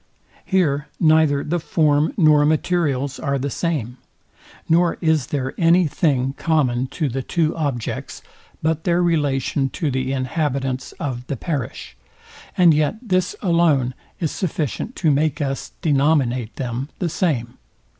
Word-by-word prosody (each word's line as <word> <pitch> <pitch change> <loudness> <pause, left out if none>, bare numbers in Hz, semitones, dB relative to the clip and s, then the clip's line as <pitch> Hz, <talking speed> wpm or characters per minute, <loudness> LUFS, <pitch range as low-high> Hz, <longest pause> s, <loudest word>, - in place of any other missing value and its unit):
Here 150 -7 +1
neither 155 -3 +4
the 175 +3 -1
form 150 -1 +1
nor 155 -5 +5
materials 145 -3 0
are 140 -1 -1
the 140 +1 -3
same, 135 -8 -2 0.7
nor 170 +1 +3
is 160 -4 +1
there 135 -2 -2
any 170 +1 +5
thing 135 -4 0
common 130 -6 +1
to 155 +3 -2
the 135 +1 -3
two 160 +3 0
objects, 140 -8 -4 0.4
but 160 0 0
their 175 -1 +2
relation 140 -4 +1
to 150 -1 -2
the 130 0 -1
inhabitants 135 -1 -2
of 130 -7 -5
the 140 - -3
parish; 140 -4 -4 0.6
and 175 -3 +6
yet 150 +5 +1
this 185 -6 0
alone 165 -8 +2 0.3
is 160 -5 -1
sufficient 175 - -3
to 160 -4 +2
make 150 +3 +1
us 135 -2 -3
denominate 135 -6 +1
them 125 +2 -4
the 180 - -1
same. 140 -9 -1
150 Hz, 135 wpm, -21 LUFS, 135-165 Hz, 0.7 s, and